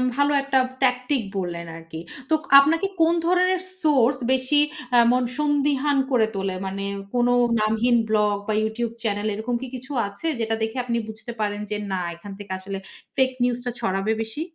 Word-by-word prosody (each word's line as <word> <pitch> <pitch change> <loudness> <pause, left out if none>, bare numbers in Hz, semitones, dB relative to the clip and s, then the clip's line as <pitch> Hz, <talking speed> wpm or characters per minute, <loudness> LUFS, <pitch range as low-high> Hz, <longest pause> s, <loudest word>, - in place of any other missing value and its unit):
ভালো 285 +1 +3
একটা 275 -1 +1 0.3
ট্যাকটিক 250 +1 +2 0.2
বললেন 175 -2 -3
আরকি। 165 -1 -9 0.3
তো - - +2 0.3
আপনাকে 325 +7 +3
কোন 325 +1 +5
ধরনের 365 +1 +3 0.2
সোর্স 270 -4 +4
বেশি 260 +3 +3 0.4
আ - - +7
এমন 250 +2 +3 0.2
সন্দিহান 290 -1 +2
করে 235 -4 +4
তোলে 195 -1 -2
মানে 195 +1 -4 0.3
কোন 245 0 +3 0.3
নামহীন 220 +3 +2
ব্লগ 210 -1 +2
বা 215 - +1
ইউটিউব 220 +2 -1
চ্যানেল, 205 -1 -1
এরকম 220 +4 -2
কি 260 - -5
কিছু 260 +2 -9 0.2
আছে? 200 +11 -6
যেটা 225 -1 0
দেখে 220 +3 -2
আপনি 235 -1 -1
বুঝতে 225 +2 -8
পারেন 205 -1 -1
যে 210 - 0
না 185 -1 -1
এখান 195 +4 -11
থেকে 200 -1 -9
আসলে 195 +1 -6 0.4
ফেক 260 -1 +3
নিউজটা 245 0 -1
ছড়াবে 195 -1 0
বেশি? 225 +6 -4
235 Hz, 170 wpm, -23 LUFS, 210-270 Hz, 0.4 s, আ